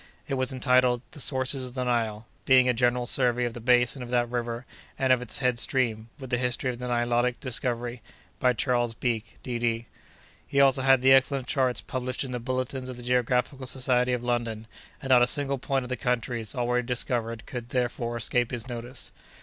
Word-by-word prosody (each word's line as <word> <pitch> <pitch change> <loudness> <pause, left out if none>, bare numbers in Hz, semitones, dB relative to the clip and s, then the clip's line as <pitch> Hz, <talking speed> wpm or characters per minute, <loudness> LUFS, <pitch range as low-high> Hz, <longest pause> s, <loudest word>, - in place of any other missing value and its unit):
It - - -3
was 130 -1 0
entitled 125 -1 +2
"The 150 - -10
Sources 130 0 0
of 125 0 -7
the 130 - -1
Nile; 115 -3 -1 0.2
being 130 -1 +6
a 125 - +3
General 120 +1 +1
Survey 125 -1 +2
of 120 - -3
the 120 - -7
Basin 125 +2 +2
of 125 - -7
that 120 -1 +1
River 120 0 -3 0.3
and 130 -1 +3
of 125 - +1
its 125 - -3
Head 125 -3 +1
Stream, 115 -3 -1
with 130 -2 -9
the 125 - +1
History 125 +1 -1
of 120 - -9
the 125 - -4
Nilotic 120 0 +1
Discovery, 120 -2 -2 0.4
by 125 -1 +3
Charles 120 -1 0
Beke, 115 -3 -3
D.D." 120 -2 -1 0.6
He 140 - 0
also 135 -1 +5
had 135 -1 +4
the 135 0 +7
excellent 135 0 +3
charts 130 -2 +1
published 130 +1 -3
in 130 - -6
the 125 - -3
"Bulletins 130 +1 -3
of 125 - -7
the 120 - -9
Geographical 125 +2 0
Society 125 -1 +1
of 125 -1 -2
London;" 115 -2 -2 0.4
and 135 - -2
not 125 -1 +7
a 120 - +5
single 140 0 +2
point 135 0 -1
of - - -9
the 125 - -1
countries 120 -2 -2
already 125 0 0
discovered 115 -2 -1
could, 120 -2 -7
therefore, 120 -1 -2
escape 120 +1 +1
his 120 -1 -5
notice. 120 +1 -7
125 Hz, 200 wpm, -27 LUFS, 120-130 Hz, 0.6 s, the